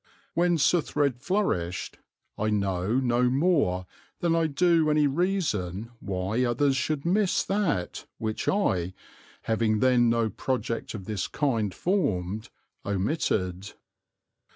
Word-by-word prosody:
When 175 0 +2
Suthred 145 -4 +1
flourished 115 - -1 0.4
I 110 +1 -1
know 100 -1 0
no 125 -1 +2
more 135 - +2 0.3
than 170 -1 +1
I 165 -1 +2
do 165 +1 +3
any 150 0 +3
reason 135 - -1
why 100 +5 -1
others 130 +3 +2
should 145 +2 -1
miss 190 +2 +2
that 195 - -1
which 110 -1 -3
I, 95 - +1 0.5
having 110 -1 +1
then 120 0 +4
no 115 -2 +1
project 115 -1 -3
of 100 -3 -7
this 105 -2 -2
kind 115 -9 0
formed, 110 - -1 0.3
omitted. 100 - -1
120 Hz, 115 wpm, -27 LUFS, 100-160 Hz, 0.5 s, then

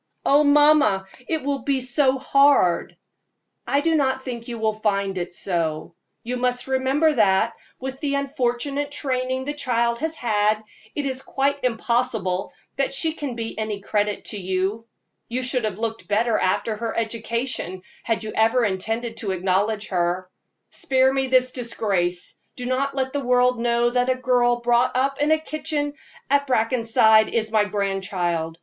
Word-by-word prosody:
"Oh, 285 +2 +5
mamma, 290 -9 +5 0.2
it 320 -3 -1
will 280 0 -1
be 275 -1 0
so 260 +1 +2
hard!" 275 -9 +3 0.7
"I 280 - +2
do 325 +2 +1
not 265 -3 +1
think 235 -3 -6
you 235 -1 -5
will 220 -1 0
find 200 -2 -1
it 175 -1 -4
so. 170 -3 -2 0.3
You 250 +2 -3
must 245 0 0
remember 265 +4 +2
that, 215 -1 +3 0.3
with 265 0 -6
the 285 -2 -1
unfortunate 280 +1 -1
training 260 -2 -2
the 290 - -2
child 235 -4 0
has 320 +1 -2
had, 215 -4 +1 0.3
it 290 - -2
is 265 -1 -3
quite 280 +1 -1
impossible 230 -6 0 0.3
that 275 - 0
she 315 +4 -1
can 285 -6 -5
be 225 -1 -5
any 215 -2 -3
credit 205 +1 -1
to 205 - -4
you. 190 +4 -2 0.4
You 255 +2 -2
should 250 -2 0
have 205 -3 -3
looked 225 0 -4
better 220 +2 +1
after 215 +4 0
her 230 +1 -4
education, 230 -4 -2 0.2
had 225 -1 -1
you 215 - -5
ever 225 +2 +3
intended 225 +4 -2
to 205 - -4
acknowledge 195 +4 0
her. 180 0 -1 0.4
Spare 265 0 +2
me 270 -1 0
this 255 0 +3
disgrace; 195 -8 -2 0.2
do 250 - -6
not 270 +2 -1
let 265 -1 -1
the 285 -1 -2
world 250 0 +3
know 235 0 +2
that 250 +1 +1
a 255 - +3
girl 245 -2 +2
brought 240 +1 +2
up 275 +2 0
in 295 - +2
the 315 - +5
kitchen 305 -2 -3 0.3
at 280 0 +2
Brackenside 225 -2 +3
is 220 -1 -1
my 215 -2 +3
grandchild. 190 -5 -2
240 Hz, 165 wpm, -23 LUFS, 215-265 Hz, 0.7 s, Oh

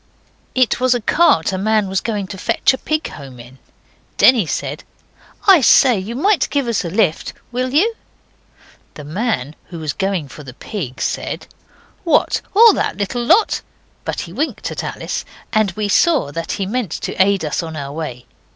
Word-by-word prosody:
It 255 -2 +2
was 255 0 +3
a - - 0
cart 215 - +3
a 190 - -2
man 215 0 +1
was 190 0 -1
going 210 -4 -2
to 195 - -7
fetch 230 +5 +2
a 260 - -4
pig 310 0 -2
home 135 -4 -11
in. 125 +3 -14 0.6
Denny 235 -9 +5
said - - -4 0.6
'I 380 -6 +7
say, 250 -2 +5
you 210 +5 -6
might 355 +3 +2
give 280 -3 -1
us 230 -4 0
a 170 - -4
lift. 185 -4 0 0.2
Will 255 +1 -2
you?' 385 - +3 1.0
The 150 - -9
man 155 - -2
who 175 - -9
was 155 -3 -3
going 190 -6 -2
for 150 - -11
the 130 -4 -11
pig 150 - -6
said - - -3 0.6
'What, 335 - +2
all 450 0 +8
that - - -2
little 215 +4 -2
lot?' 360 - +3 0.4
but - - -3
he 170 - -9
winked 295 +9 -3
at - - -4
Alice, - - -4 0.3
and 215 -2 +3
we 210 +2 -2
saw 275 - +2
that 165 +3 -4
he 195 - -2
meant 225 0 -2
to - - -4
aid 195 -3 +2
us 150 - -1
on 160 -1 -7
our 140 -2 -5
way. 140 -5 -6
205 Hz, 185 wpm, -18 LUFS, 160-255 Hz, 1.0 s, all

